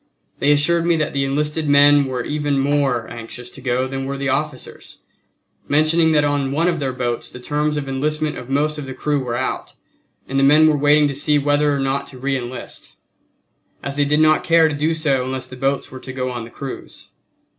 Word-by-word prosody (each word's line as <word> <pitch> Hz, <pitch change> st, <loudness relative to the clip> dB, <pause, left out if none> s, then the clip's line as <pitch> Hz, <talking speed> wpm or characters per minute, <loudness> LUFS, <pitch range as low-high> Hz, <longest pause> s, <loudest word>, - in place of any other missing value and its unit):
They 145 Hz, -, +3 dB
assured 165 Hz, +4 st, +2 dB
me 170 Hz, -, +3 dB
that 155 Hz, -2 st, -1 dB
the 140 Hz, 0 st, 0 dB
enlisted 150 Hz, +2 st, -1 dB
men 145 Hz, 0 st, +6 dB
were 130 Hz, -2 st, -3 dB
even 145 Hz, 0 st, -1 dB
more 135 Hz, -4 st, +1 dB
anxious 120 Hz, +1 st, -9 dB
to 135 Hz, -, -11 dB
go 125 Hz, 0 st, 0 dB
than 135 Hz, 0 st, -4 dB
were 140 Hz, +1 st, -4 dB
the 140 Hz, 0 st, -2 dB
officers, 135 Hz, 0 st, -4 dB, 0.7 s
mentioning 155 Hz, +2 st, +3 dB
that 150 Hz, -1 st, +3 dB
on 145 Hz, -2 st, 0 dB
one 160 Hz, +5 st, +1 dB
of 170 Hz, -2 st, 0 dB
their 135 Hz, -2 st, -1 dB
boats 120 Hz, -2 st, -3 dB
the 125 Hz, -, -11 dB
terms 150 Hz, +3 st, -1 dB
of 140 Hz, -2 st, -4 dB
enlistment 150 Hz, +3 st, -1 dB
of 125 Hz, -, -9 dB
most 150 Hz, +2 st, 0 dB
of 140 Hz, -, -7 dB
the 130 Hz, -, -7 dB
crew 150 Hz, -1 st, -1 dB
were 120 Hz, -1 st, -3 dB
out, 130 Hz, -, -4 dB, 0.5 s
and 135 Hz, 0 st, -1 dB
the -, -, +3 dB
men 150 Hz, +3 st, +6 dB
were 155 Hz, -, +3 dB
waiting 145 Hz, +1 st, +4 dB
to 140 Hz, -, -3 dB
see 145 Hz, +2 st, +2 dB
whether 145 Hz, +1 st, +2 dB
or 140 Hz, -, 0 dB
not 135 Hz, +1 st, -1 dB
to 130 Hz, -, -11 dB
reenlist, 130 Hz, -1 st, -5 dB, 0.9 s
as 140 Hz, 0 st, -4 dB
they 145 Hz, 0 st, +2 dB
did 150 Hz, +2 st, +2 dB
not 155 Hz, 0 st, +4 dB
care 165 Hz, -1 st, +4 dB
to 155 Hz, -, -2 dB
do 155 Hz, +3 st, 0 dB
so 140 Hz, -5 st, 0 dB
unless 130 Hz, 0 st, -4 dB
the 130 Hz, -, -10 dB
boats 135 Hz, +1 st, -2 dB
were 130 Hz, -, -8 dB
to 130 Hz, -, -8 dB
go 130 Hz, -1 st, -3 dB
on 120 Hz, -2 st, -5 dB
the -, -, -12 dB
cruise. 135 Hz, +2 st, -9 dB
140 Hz, 220 wpm, -20 LUFS, 130-150 Hz, 0.9 s, men